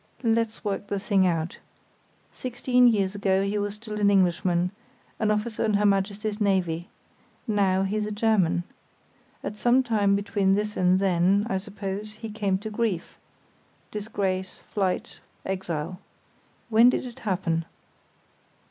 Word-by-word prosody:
"Let's 230 Hz, -1 st, 0 dB
work 205 Hz, 0 st, -2 dB
the 200 Hz, -, -2 dB
thing 195 Hz, -2 st, +2 dB
out. 165 Hz, -1 st, -2 dB, 0.7 s
Sixteen 250 Hz, 0 st, +2 dB
years 200 Hz, -4 st, +2 dB
ago 195 Hz, -1 st, +1 dB
he 200 Hz, +1 st, -1 dB
was 205 Hz, 0 st, -2 dB
still 210 Hz, -1 st, -6 dB
an 200 Hz, -, +5 dB
Englishman, 180 Hz, -2 st, +2 dB, 0.5 s
an 215 Hz, -, +1 dB
officer 215 Hz, +1 st, 0 dB
in 215 Hz, -2 st, +2 dB
Her 205 Hz, +1 st, +2 dB
Majesty's 205 Hz, +2 st, 0 dB
Navy. 180 Hz, -4 st, +1 dB, 0.6 s
Now 195 Hz, -3 st, +2 dB
he's 210 Hz, +2 st, -1 dB
a -, -, -4 dB
German. 205 Hz, -5 st, +2 dB, 0.8 s
At 210 Hz, -, -5 dB
some 245 Hz, +4 st, +4 dB
time 210 Hz, -5 st, +2 dB
between 200 Hz, -1 st, +1 dB
this 210 Hz, +1 st, -2 dB
and 185 Hz, 0 st, +3 dB
then, 190 Hz, +2 st, +3 dB
I 190 Hz, -, +1 dB
suppose, 205 Hz, +1 st, -6 dB
he 220 Hz, 0 st, -8 dB
came 200 Hz, -3 st, 0 dB
to 215 Hz, +3 st, -7 dB
grief—disgrace, 200 Hz, -1 st, -4 dB
flight, 190 Hz, -3 st, -3 dB, 0.3 s
exile. 185 Hz, -2 st, -3 dB, 0.7 s
When 230 Hz, +2 st, +7 dB
did 255 Hz, -, 0 dB
it 245 Hz, -2 st, -9 dB
happen?" 175 Hz, -5 st, -1 dB
200 Hz, 135 wpm, -26 LUFS, 190-215 Hz, 0.8 s, When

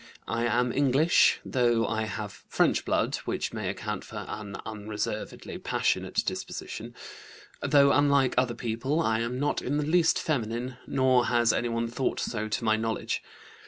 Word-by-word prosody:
I 115 Hz, 0 st, 0 dB
am 120 Hz, +1 st, +1 dB
English, 145 Hz, +4 st, +4 dB
though 120 Hz, -3 st, +2 dB
I 110 Hz, -1 st, -1 dB
have 105 Hz, -4 st, -6 dB
French -, -, +2 dB
blood, -, -, +1 dB
which -, -, -2 dB
may -, -, -3 dB
account -, -, -4 dB
for -, -, -7 dB
an 105 Hz, -2 st, -6 dB
unreservedly 105 Hz, 0 st, -5 dB
passionate -, -, 0 dB
disposition. -, -, -5 dB, 0.7 s
Though 140 Hz, -1 st, +5 dB
unlike 140 Hz, -2 st, +3 dB
other 125 Hz, -2 st, +1 dB
people, 120 Hz, +7 st, -1 dB
I 115 Hz, -9 st, +1 dB
am 120 Hz, +2 st, -2 dB
not 145 Hz, -, 0 dB
in 145 Hz, -, -1 dB
the 150 Hz, -, 0 dB
least 165 Hz, +2 st, +3 dB
feminine, 125 Hz, -3 st, -2 dB
nor 130 Hz, -2 st, +3 dB
has 120 Hz, -1 st, +3 dB
anyone 115 Hz, -1 st, -1 dB
thought 120 Hz, +3 st, -2 dB
so 110 Hz, -2 st, -2 dB
to 110 Hz, -, -2 dB
my 110 Hz, -1 st, +3 dB
knowledge. 115 Hz, 0 st, -2 dB
120 Hz, 155 wpm, -28 LUFS, 115-135 Hz, 0.7 s, Though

